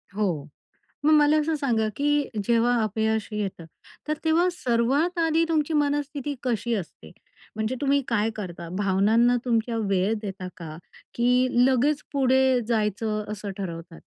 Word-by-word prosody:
हो, 175 -9 -1 0.6
मग 310 - +5
मला 300 0 +5
असं 315 +1 0
सांगा 235 -7 0
की 290 +1 +1
जेव्हा 235 +2 +2
अपयश 220 +1 -1
येतं, 195 -5 -4 0.4
तर 305 - +1
तेव्हा 325 +3 +3
सर्वात 275 +5 0
आधी 325 0 +2
तुमची 315 -1 0
मनस्थिती 290 -1 -1
कशी 235 -1 -1
असते? 160 - -8 0.4
म्हणजे 220 +3 -2
तुम्ही 280 0 +2
काय 225 -1 +1
करता, 175 -5 -7
भावनांना 210 +5 +3
तुमच्या 230 -1 0
वेळ 200 -1 +1
देता 190 -3 -6
का? 155 -3 -8 0.4
की 250 +2 +3 0.2
लगेच 275 +3 +2
पुढे 265 -1 +3
जायचं 215 -1 -1
असं 205 -1 -5
ठरवतात? 165 -3 -7
235 Hz, 135 wpm, -25 LUFS, 205-285 Hz, 0.6 s, मग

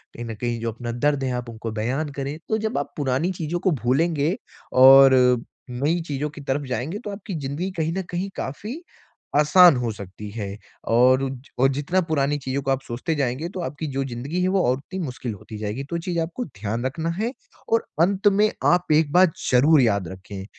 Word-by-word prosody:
कहीं 120 - -6
न 115 -1 -5
कहीं 120 -1 -1
जो 115 - -1
अपना 120 +1 -6
दर्द 135 +3 0
है 130 - -1
आप 120 -1 -8
उनको 115 0 -6
बयान 125 +8 -2
करें, 140 +2 -3
तो 220 - +2
जब 220 -7 -2
आप 140 - -5
पुरानी 145 +5 0
चीज़ों 170 0 -3
को 185 - +1
भूलेंगे 155 +5 +1 0.4
और 135 +1 +9 0.6
नई 145 +8 0
चीज़ों 145 +1 -2
की 150 - -10
तरफ 140 +1 -2
जाएँगे 130 - -3
तो - - -3
आपकी 200 -1 -6
ज़िंदगी 145 +7 -3
कहीं 160 0 0
न - - 0
कहीं 180 +3 -2
काफ़ी 215 - -5 0.6
आसान 165 +2 +7
हो 120 -2 -1
सकती 100 +1 -9
है। 100 -2 -5 0.3
और 125 +3 +5
उज 135 0 -6
और 135 +1 +5
जितना 145 +7 0
पुरानी 145 -1 +1
चीज़ों 135 +1 -3
को 135 - 0
आप 135 0 0
सोचते 125 +7 -3
जाएँगे 140 +2 -1
तो 190 - -7
आपकी 150 +2 -4
जो 135 +1 0
ज़िंदगी 135 +8 -3
है - - +2
वो 190 -1 +2
और 130 - +2
उतनी 185 +8 -8
मुश्किल 125 -7 -4
होती 105 +2 -10
जाएगी, 110 +5 -3
तो 170 - -5
वो 170 - -1
चीज़ 170 0 -2
आपको 170 +10 -4
ध्यान 110 -1 -4
रखना 160 +5 -2
है। 230 +3 0 0.4
और 230 - +2 0.2
अंत 195 +4 +3
में 205 +1 +4 0.2
आप 175 -2 +3
एक 150 -1 +3
बात 180 -2 +5 0.2
ज़रूर 140 +4 +5
याद 100 -6 +1
रखें, 95 +1 -8
140 Hz, 210 wpm, -23 LUFS, 125-170 Hz, 0.6 s, और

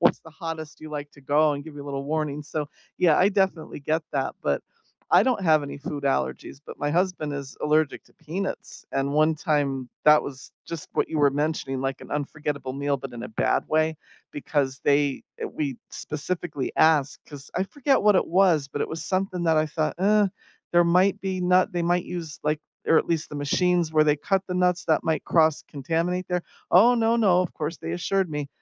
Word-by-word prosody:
"What's - - +4
the 160 - -14
hottest 160 -1 -7
you 155 - -9
like 145 -1 -5
to 140 - -17
go?" 150 +3 +3
and 140 0 -4
give 160 -2 -10
you 145 - -7
a - - -11
little 140 -1 -4
warning, 150 -1 -2
so, 150 0 -4 0.3
yeah, 170 -4 +5
I 190 - +5
definitely 190 -7 -1
get 155 +3 0
that, 135 -2 -1
but 70 -1 0 0.5
I - - +7
don't 240 -4 +1
have 155 -3 +4
any 140 - -6
food 145 0 -5
allergies, 70 - -1
but - - -10
my 145 - -1
husband 175 -3 0
is 140 -1 -7
allergic 150 0 +1
to - - -26
peanuts, 175 +5 -5
and 135 +1 0
one 155 +2 +3
time 145 -5 -1 0.2
that 150 0 +7
was 135 -1 -9
just 165 -3 -7
what - - +1
you 160 - -1
were 145 -1 +5
mentioning, 145 -2 -2
like 135 0 -2
an - - -12
unforgettable 145 -2 -3
meal, 140 +1 -1
but 135 -1 -8
In 120 -1 -7
a - - -6
bad 110 - 0
way, 155 0 +1 0.4
because 140 -2 -1
they 145 -1 +2 0.2
uh, - - -3
we 140 -5 -3
specifically 150 -2 -4
asked, 150 -4 +3
'cause 145 -2 -11
I 185 - +1
forget 270 +7 +1
what 210 -1 +5
it - - +2
was, 170 -5 +3
but 145 - -5
it - - -1
was 160 - -5
something 185 -2 -1
that 160 -1 +3
I 155 - +2
thought, 155 0 -1
"Uh, 205 +2 +4 0.4
there 175 0 +5
might 180 +3 +3
be 190 -1 -2
nut 180 +1 +3
they 175 -1 -1
might 175 +1 +1
use, 165 -4 -6
like, 150 0 0 0.3
or 165 - +5
at - - -1
least 165 -2 -1
the - - -9
machines 170 +3 +1
where 155 -1 +5
they 150 -1 +3
cut 190 +6 0
the 180 - -4
nuts 180 -1 +1
that 155 -2 +2
might 160 -2 0
cross 160 -2 +3
contaminate 170 +5 -2
there." 180 -1 -1 0.3
"Oh 230 +7 +7
no, 230 -1 +2
no," 190 -6 +4
of 180 - -5
course 155 +1 -3
they 165 - -5
assured 185 +2 0
me. 150 -2 -3
155 Hz, 215 wpm, -25 LUFS, 145-180 Hz, 0.5 s, I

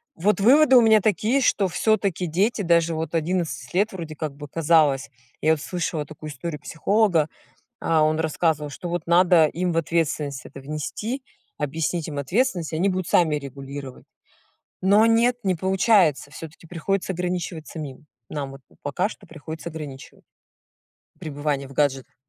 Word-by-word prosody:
вот 205 +6 +1
выводы 265 +5 +6
у 245 - +9
меня 220 -1 +6
такие, 215 +7 +1
что 205 -6 +2
всё-таки 195 -1 0
дети, 200 +7 +1
даже 170 -2 +3
вот 160 +1 -3
11 170 +1 -2
лет 205 +4 +2
вроде 165 -4 -6
как 150 -2 -4
бы 145 0 -9
казалось, 150 -4 +2 0.3
я 155 - +3
вот 155 -2 +1
слышала 165 -4 -3
такую 155 0 -9
историю 150 +2 -5
психолога, 180 -2 +2 0.5
а, 160 -1 +2
он 155 +1 +1
рассказывал, 155 -2 0
что 145 +6 -7
вот 170 -1 -3
надо 175 -2 +5
им 175 +3 -2
в - - -3
ответственность 150 -4 -1
это 135 - -11
внести, 155 - -4 0.4
объяснить 160 +3 -2
им 145 -2 -5
ответственность, 175 - 0
они 175 +5 +1
будут 185 -2 -2
сами 160 -4 +3
регулировать. 140 -1 -8 0.8
Но 205 +4 +5
нет, 235 +2 +3
не 190 - +2
получается, 190 - +2
всё-таки 160 +2 -11
приходится 190 +3 -2
ограничивать 175 -2 -3
самим. 150 -2 -8 0.2
Нам 140 -3 -4
вот 135 - -11 0.2
пока 180 +8 -1
что - - -13
приходится 160 +1 -8
ограничивать. 145 -4 -9 1.0
Пребывание 145 -2 -3
в 135 - -13
гаджетах. 135 -3 0
165 Hz, 155 wpm, -24 LUFS, 150-185 Hz, 1.0 s, у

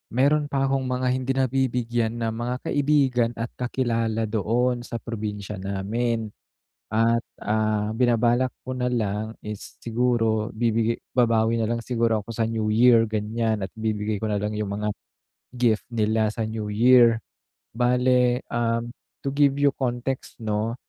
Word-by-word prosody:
meron 145 +3 +3
pa 135 -1 0
akong 135 -1 0
mga 125 0 -1
hindi 130 +1 -1
nabibigyan 120 -3 0
ng 110 - 0
mga 120 +2 -3 0.2
kaibigan 135 -5 +2
at 115 +1 -4
kakilala 115 -3 0
doon 120 +3 +1
sa 120 - -7
probinsya 105 -3 -5
namin. 110 +4 -2 0.6
At, 115 +1 +2 0.2
ah, 110 0 0
binabalak 120 +1 +2 0.2
ko 130 - -3
na 125 0 -1
lang 110 -1 -1
is 105 -1 -8
siguro 115 -2 0
bibigay 115 0 0 0.2
babawi 115 -1 +3
nalang 115 +1 0
siguro 115 -2 0
ako 110 +2 -9
sa 115 - +1
New 110 -1 -1
Year 115 +1 +5
ganyan 110 0 -1
at 95 - -8
bibigay 105 -1 -1
ko 110 - -2
nalang 105 0 -1
yung 100 -1 -2
mga 105 0 -1 0.6
gift 120 -3 +1
nila 110 -1 +1
sa 115 - -4
New 110 -2 -4
Year. 120 0 +5 0.6
Bale, 125 0 +3
um, 115 0 0 0.3
to - - -2
give 140 0 +3
you 145 0 +5
context 130 0 -3
no, 110 +1 -1
115 Hz, 145 wpm, -24 LUFS, 110-125 Hz, 0.6 s, Year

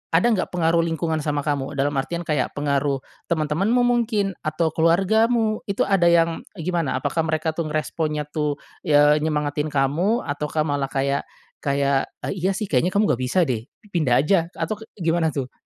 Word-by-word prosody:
ada 180 +8 +4
nggak 195 - 0
pengaruh 165 -1 +2
lingkungan 160 -1 -1
sama 145 -1 0
kamu, 145 -2 -2
dalam 140 +1 +1
artian 170 +5 -3
kayak 150 -5 -1
pengaruh 140 -1 0 0.3
teman-temanmu 170 +9 +1
mungkin, 230 -5 +1
atau 155 +1 0
keluargamu, 215 +7 +2
itu 200 - -1
ada 195 -3 +2
yang, 165 -1 +2
e 170 - -7
gimana, 170 -7 -1
apakah 165 - 0
mereka 155 0 0
tuh 165 0 -3
ngeresponnya 155 0 -2
tuh, 150 -2 -1 0.3
ya 145 -1 +5
nyemangatin 150 -1 -1
kamu 165 - +1
ataukah 150 +1 -2
malah 145 -2 -1
kaya 140 +1 0 0.4
kayak, 140 -1 +1 0.2
e - - -2
"Iya 190 +2 0
sih, 215 - -2
kayaknya 170 +8 +2
kamu 210 +1 +3
nggak 125 - -1
bisa 180 +8 +2
deh, 120 -4 -2 0.2
pindah 135 -6 +2
aja," 170 0 +2
atau 215 -1 -3
kek 220 - -12 0.2
gimana 165 -1 +2
tuh? 130 -2 -3
160 Hz, 175 wpm, -23 LUFS, 145-180 Hz, 0.4 s, ya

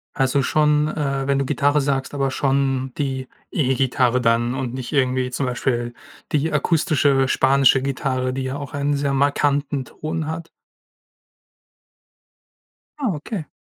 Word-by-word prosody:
Also 135 0 +2
schon, 150 +2 +2
äh, 140 -3 -2
wenn 140 -1 +2
du 140 - 0
Gitarre 145 +1 +2
sagst, 135 -1 -1
aber 135 -2 0
schon 135 -1 0
die 130 -3 -2 0.2
E-Gitarre 130 -3 +1
dann 120 +1 +1
und 130 -2 -3
nicht 130 -2 -5
irgendwie 130 -2 +1
zum 130 +2 -2
Beispiel 120 -1 -1 0.4
die 155 +2 +1
akustische, 150 -3 +2
spanische 135 0 +4
Gitarre, 130 -1 -1
die 135 0 -3
ja 130 +2 -3
auch 140 -2 -7
einen 145 0 0
sehr 140 0 0
markanten 140 -1 +1
Ton 155 +4 -4
hat. 165 +1 -5 2.5
Ah, 260 -6 0
okay. 155 +2 -5
135 Hz, 135 wpm, -21 LUFS, 130-145 Hz, 2.5 s, spanische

